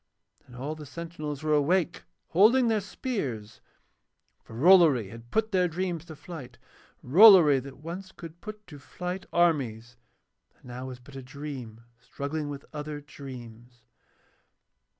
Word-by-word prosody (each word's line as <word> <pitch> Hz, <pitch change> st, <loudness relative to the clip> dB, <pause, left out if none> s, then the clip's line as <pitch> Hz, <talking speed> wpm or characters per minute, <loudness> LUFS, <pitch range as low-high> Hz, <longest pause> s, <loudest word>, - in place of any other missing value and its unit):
And 125 Hz, -, -14 dB
all 135 Hz, +5 st, -4 dB
the 155 Hz, -2 st, -10 dB
sentinels 155 Hz, -2 st, -6 dB
were 155 Hz, 0 st, +1 dB
awake 170 Hz, +4 st, +1 dB, 0.2 s
holding 230 Hz, +7 st, +5 dB
their 220 Hz, -2 st, +1 dB
spears, 140 Hz, -, -5 dB, 0.8 s
for 115 Hz, -, -13 dB
Rollory 150 Hz, -, +5 dB
had 115 Hz, +2 st, -12 dB
put 220 Hz, -, 0 dB
their 180 Hz, -2 st, +3 dB
dreams 175 Hz, -1 st, -3 dB
to 160 Hz, -2 st, -10 dB
flight, 140 Hz, -7 st, -10 dB, 0.5 s
Rollory 165 Hz, -, +8 dB
that 135 Hz, +1 st, -11 dB
once 175 Hz, +6 st, -8 dB
could 165 Hz, -2 st, -12 dB
put 215 Hz, -1 st, -9 dB
to 150 Hz, -5 st, -12 dB
flight 180 Hz, +6 st, -6 dB
armies 120 Hz, -9 st, 0 dB, 0.6 s
and -, -, -25 dB
now 125 Hz, +1 st, -7 dB
was 130 Hz, -1 st, -7 dB
but 135 Hz, +2 st, -15 dB
a 135 Hz, -, -6 dB
dream 130 Hz, -4 st, -8 dB, 0.2 s
struggling 140 Hz, +4 st, -5 dB
with 140 Hz, -1 st, -7 dB
other 150 Hz, 0 st, -5 dB
dreams. 120 Hz, -4 st, -12 dB
150 Hz, 140 wpm, -28 LUFS, 125-180 Hz, 0.8 s, Rollory